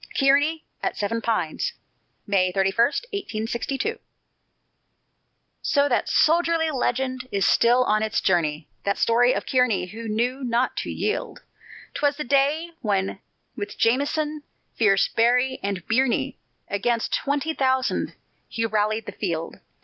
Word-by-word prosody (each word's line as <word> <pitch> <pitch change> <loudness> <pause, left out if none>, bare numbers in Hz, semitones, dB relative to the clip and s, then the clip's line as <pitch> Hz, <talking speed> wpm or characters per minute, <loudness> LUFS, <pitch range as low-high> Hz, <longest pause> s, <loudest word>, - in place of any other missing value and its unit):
KEARNY 285 +4 +3 0.2
AT - - -2
SEVEN 230 +3 -1
PINES 215 -9 -1 0.5
[May 185 -3 +2
31, 195 +1 +1 0.4
1862] 270 - -3 1.6
So 285 -2 +2
that 250 - 0
soldierly 330 0 +3
legend 255 -1 -1
is 200 -1 +1
still 245 +2 +4
on 215 -3 +1
its 220 -1 0
journey, 155 -4 0 0.2
That 200 0 0
story 245 +2 +4
of - - -3
Kearny 250 -8 +2
who 225 +2 -7
knew 245 +5 -1
not 245 +1 0
to - - -3
yield! - - -3 0.5
'Twas 290 -1 0
the 300 - -3
day 285 +5 +1
when 195 -2 -1 0.4
with 205 -5 -6
Jameson, 295 +5 +1 0.3
fierce 200 -3 +3
Berry, 250 +3 +2
and 195 -3 -3
Birney, 250 +2 +1 0.3
Against 225 +3 -1
twenty 290 +3 0
thousand 260 -2 0 0.3
he 225 - -1
rallied 215 0 0
the - - -6
field. 165 -5 -4
240 Hz, 125 wpm, -24 LUFS, 210-275 Hz, 1.6 s, still